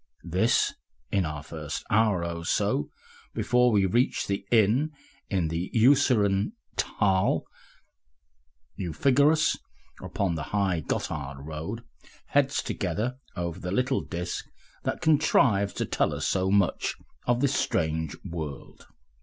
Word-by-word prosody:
(This, - - +2 0.4
in 95 -5 +1
our 75 -1 -5
first 80 +1 -6
hour 105 -5 +3
or 85 0 -4
so 105 +9 0 0.5
before 125 0 +3
we 100 -3 +3
reach 120 +7 +1
the 100 0 -2
inn 120 +7 +3 0.4
in 90 -5 0
the 85 +3 -3
Urseren 110 - +4 0.2
Thal.) 95 -3 +1 1.3
You 90 -4 -4
figure 140 - +4
us 155 -1 +2 0.4
upon 95 -4 -1
the 80 - -3 0.2
high 95 -4 +1
Gotthard 70 -2 -4
road, 80 +10 -5 0.5
heads 140 -1 +2
together 110 +8 -2 0.2
over 85 0 -3
the 90 - -5
little 125 +7 +1
disk 90 0 -5 0.4
that - - -2
contrives 135 -10 +3
to - - -2
tell - - 0
us - - -3
so 95 0 +1
much 100 -3 +2 0.3
of 120 0 +3
this 140 -1 +2
strange 80 - 0
world. 80 -5 -7
100 Hz, 130 wpm, -27 LUFS, 85-125 Hz, 1.3 s, Urseren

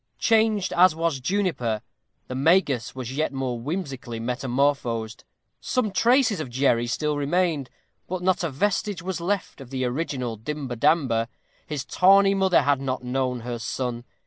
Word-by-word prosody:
Changed 220 -3 +2
as 180 -1 +5
was 165 -4 -1
Juniper, 130 - -1 0.4
the - - -5
Magus 140 -3 +2
was 130 0 -5
yet 155 +2 0
more 130 -3 -3
whimsically 135 -5 -4
metamorphosed. 125 -2 -1 0.4
Some 235 -5 -1
traces 230 - +3
of 155 - -4
Jerry 120 -2 +2
still 150 +4 -1
remained, 150 -1 0 0.4
but 180 0 -4
not 185 -1 +2
a 170 - 0
vestige 195 +4 -1
was 185 -2 -3
left 185 -4 -2
of 130 - -11
the 130 -1 -2
original 125 -3 -3
Dimber 135 +2 -5
Damber. 130 -4 +2 0.4
His 150 -3 -4
tawny 195 +1 +5
mother 190 -5 +3
had 140 -1 +2
not 130 -2 -3
known 125 -1 -1
her 120 0 -5
son. 120 +1 -3
140 Hz, 150 wpm, -25 LUFS, 125-180 Hz, 0.4 s, as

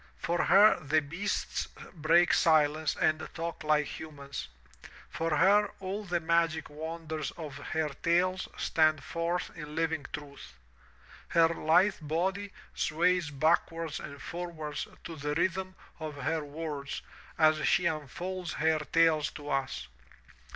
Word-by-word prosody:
For 175 +1 0
her 205 +3 +7
the 155 +2 +2
beasts 170 +8 -2 0.3
break 170 +1 +4
silence 155 -1 +3
and 155 0 +2 0.2
talk 165 0 -4
like 150 -1 +3
humans. 140 - -7 0.6
For 165 -2 0
her 205 +5 +5
all 195 +2 -4
the 175 -2 0
magic 165 -1 +1
wonders 160 -1 -4
of 150 -5 -7
her 155 +2 -2
tales 175 +6 +1
stand 155 -2 +2
forth 170 +1 -2
in 150 -2 -8
living 160 -3 -1
truth. 140 - -9 0.7
Her 165 -1 +4
lithe 175 +5 +3
body 190 +6 -1 0.2
sways 175 0 +1
backwards 160 +2 +1
and 140 0 -8
forwards 160 -1 -5 0.2
to 165 - -7
the 145 0 -3
rhythm 185 +2 0 0.2
of 155 -2 -5
her 155 +3 -1
words 145 -1 -5 0.3
as 155 -1 +4
she 190 -3 +3
unfolds 170 +4 -3
her 160 0 +2
tales 155 0 +3
to 145 -1 -7
us. 135 - -2
160 Hz, 130 wpm, -30 LUFS, 150-175 Hz, 0.7 s, her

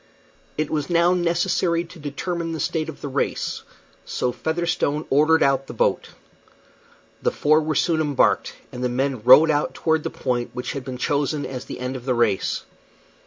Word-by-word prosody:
It 155 0 -1
was 150 0 -2
now 170 +1 +4
necessary 170 -1 +1
to 170 0 -14
determine 165 +3 -4
the 160 - -4
state 160 0 -1
of 155 - -9
the - - -4
race, 140 0 -2 0.4
so 125 - -2
Featherstone 160 0 -1
ordered 155 +4 +4
out 135 0 +1
the - - -8
boat. - - 0 1.1
The - - +2
four 155 +1 +3
were 155 0 -2
soon 160 +2 +2
embarked, 145 -3 +1 0.2
and 125 - -6
the 125 - +1
men 130 -1 -1
rowed 130 +7 +7
out 145 0 -1
toward 160 -1 +1
the - - -3
point 120 -1 -3
which 125 -1 -4
had 140 - -5
been 130 -1 -6
chosen 145 +2 -1
as 130 -1 -6
the - - -8
end 125 +1 -4
of 125 -2 -8
the 130 -2 +1
race. 115 -5 0
145 Hz, 180 wpm, -23 LUFS, 130-160 Hz, 1.1 s, rowed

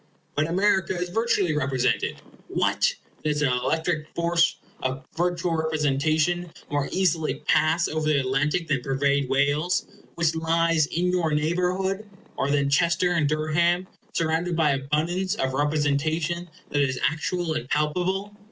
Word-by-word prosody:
But 150 +1 +1
America 190 0 +1
is 180 0 -2
virtually 200 -5 +1
represented. 130 -3 0 0.3
What! - - +1 0.3
does 150 -1 0
the 140 -3 +3
electric 155 +5 0
force 170 0 +2 0.3
of 130 0 -3
virtual 175 0 0
representation 160 +2 +1 0.2
more 145 -1 0
easily 170 -4 0
pass 160 +2 +3
over 155 0 -2
the 150 -2 +3
Atlantic 145 +6 0
than 140 -4 0
pervade 140 +1 +1
Wales, 145 +6 +1 0.3
which 165 -2 +1
lies 165 -1 +2
in 180 +3 0
your 170 -4 +1
neighborhood 180 +6 0 0.3
or 135 - -1
than 140 -1 +2
Chester 170 +4 +2
and 160 -5 +2
Durham, 170 +4 +1 0.2
surrounded 165 +2 0
by 160 -3 +3
abundance 155 +7 -1
of 130 0 -1
representation 155 +4 0 0.2
that 145 - +2
is 130 -2 0
actual 165 +1 -2
and 130 -4 -4
palpable? 185 +7 -1
160 Hz, 135 wpm, -25 LUFS, 145-175 Hz, 0.3 s, the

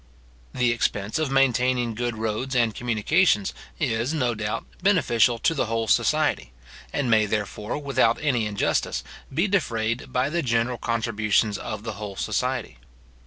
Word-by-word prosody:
The 125 -1 +1
expense 105 0 -1
of 155 -3 0
maintaining 125 -3 +2
good 120 0 -3
roads 110 +4 -2
and 120 -3 +2
communications 120 - +2 0.3
is, 115 +7 0
no 125 -5 +1
doubt, 105 +1 -3 0.2
beneficial 125 - +3
to 165 - +1
the 135 -7 -1
whole 115 0 -1
society, 115 - +1 0.4
and 140 - -1
may, 110 -2 +4
therefore, 105 +2 -3
without 130 -5 +2
any 125 -7 +1
injustice, 105 -1 -1 0.3
be 165 +9 +1
defrayed 120 - -1
by 130 +3 0
the 170 +1 0
general 120 -1 0
contributions 110 -2 +1
of 110 -2 -5
the 110 -1 -4
whole 100 -2 -5
society. 125 - -2
120 Hz, 145 wpm, -25 LUFS, 110-130 Hz, 0.4 s, may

